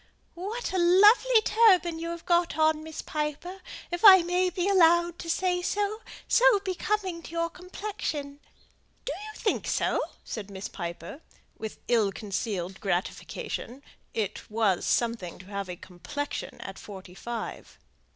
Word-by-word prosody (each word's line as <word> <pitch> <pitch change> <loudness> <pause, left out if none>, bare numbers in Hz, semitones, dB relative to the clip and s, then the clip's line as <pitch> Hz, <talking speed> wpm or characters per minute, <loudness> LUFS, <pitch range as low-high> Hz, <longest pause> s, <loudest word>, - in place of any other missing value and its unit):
"What 405 +6 -4
a 375 - +1
lovely 415 +7 +6
turban 370 -7 +4
you 335 +1 -4
have 340 0 -6
got 345 -1 +2
on, 315 0 +3
Miss 315 0 -7
Piper, 305 +5 -4 0.3
if 350 +3 -3
I 380 -4 +10
may 360 +1 +1
be 360 +1 -2
allowed 345 -2 +4
to 335 - -6
say 360 +1 +1
so: 415 +4 -1 0.3
so - - +5
becoming 380 -2 -2
to - - -10
your 335 0 -2
complexion!" 360 -7 -5 0.7
"Do - - -2
you 430 - -9
think 430 - -1
so?" - - +1 0.2
said 210 -3 -6
Miss 195 0 -6
Piper, 170 - -7 0.3
with 220 -1 -7
ill 225 -5 +3
concealed 195 -2 -4
gratification; 200 +7 -3 0.3
it 210 -2 -4
was 210 -4 +1
something 230 -7 0
to 185 - -13
have 200 -1 -5
a 180 - -4
"complexion" 190 +12 -6
at 195 - -8
forty 190 -3 -10
five. 230 +5 -6
330 Hz, 145 wpm, -28 LUFS, -, 0.7 s, I